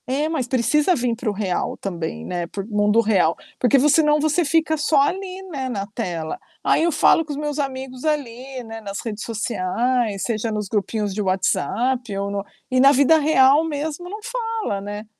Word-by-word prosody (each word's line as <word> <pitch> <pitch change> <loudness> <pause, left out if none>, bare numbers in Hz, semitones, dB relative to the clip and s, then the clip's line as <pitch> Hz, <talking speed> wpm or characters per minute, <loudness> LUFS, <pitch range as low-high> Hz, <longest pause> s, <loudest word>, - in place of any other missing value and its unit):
É, 275 +4 0
mas 310 -6 -2
precisa 295 +8 +2
vir 240 -4 0
para 230 -1 -3
o - - -1
real 195 -3 -2
também, 165 - -5
né, 175 -1 -3
por 195 +3 -6
mundo 210 0 +2
real, 195 -7 +2 0.2
porque 265 +2 +4
senão 300 0 +4
você 310 +3 +2
fica 315 +1 +2
só 300 -1 +2
ali, 370 +6 -1
né, 280 -8 -5
na 200 -5 -3
tela. 175 -7 -4 0.2
Aí - - +3
eu 340 - +2
falo 325 +2 +4
com 305 - -8
os 285 - -4
meus 295 0 -3
amigos 260 -2 -4
ali, 265 -4 -3
né, 225 -1 -8
nas 200 -1 -5
redes 215 -2 -4
sociais, 225 0 -1
seja 225 -1 -1
nos 210 -1 -3
grupinhos 210 0 -1
de 210 - -2
WhatsApp 225 +4 0
ou 200 0 -2
no 200 -1 -2 0.3
e 255 - +3
na 275 +2 +7
vida 285 +3 +5
real 285 0 +5
mesmo 315 +2 -4
não 420 +3 -6
fala, 455 - -3
né, 205 +2 -6
250 Hz, 190 wpm, -22 LUFS, 210-300 Hz, 0.3 s, na